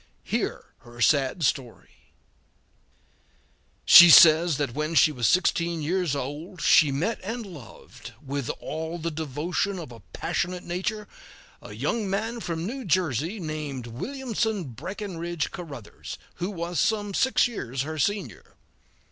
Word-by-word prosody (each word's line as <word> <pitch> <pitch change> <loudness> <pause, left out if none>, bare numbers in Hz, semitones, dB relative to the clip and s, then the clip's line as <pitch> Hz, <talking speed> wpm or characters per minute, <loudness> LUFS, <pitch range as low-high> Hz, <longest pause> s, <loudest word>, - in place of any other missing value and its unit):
Hear - - -3
her 120 0 -15
sad 140 +5 +2
story: 125 -3 -4 1.7
She 175 0 +10
says 160 -1 +8
that 140 -5 -2
when 155 +3 -3
she 155 - +6
was 125 -5 0
sixteen 170 -2 +1
years 175 -2 0
old 150 +7 -6
she 150 -4 +5
met 165 +12 -1
and 225 +3 -5
loved, 150 - -12
with 140 -3 -4
all 160 +2 -5
the 165 0 -3
devotion 160 +6 -2
of 160 -8 -8
a 115 - -11
passionate 175 - -4
nature, 200 +4 -3 0.5
a 105 - -10
young 170 - -2
man 220 +5 -2
from 165 -5 -4
New 260 +6 -5
Jersey, 175 - 0
named 155 -6 -5
Williamson 220 - -3
Breckinridge 175 - -5
Caruthers, 145 - -9 0.2
who 180 - -3
was 170 -4 -4
some 205 +1 0
six 260 +5 +3
years 135 - -4
her 155 +1 -5
senior. 205 +7 -3
165 Hz, 130 wpm, -25 LUFS, 145-190 Hz, 1.7 s, She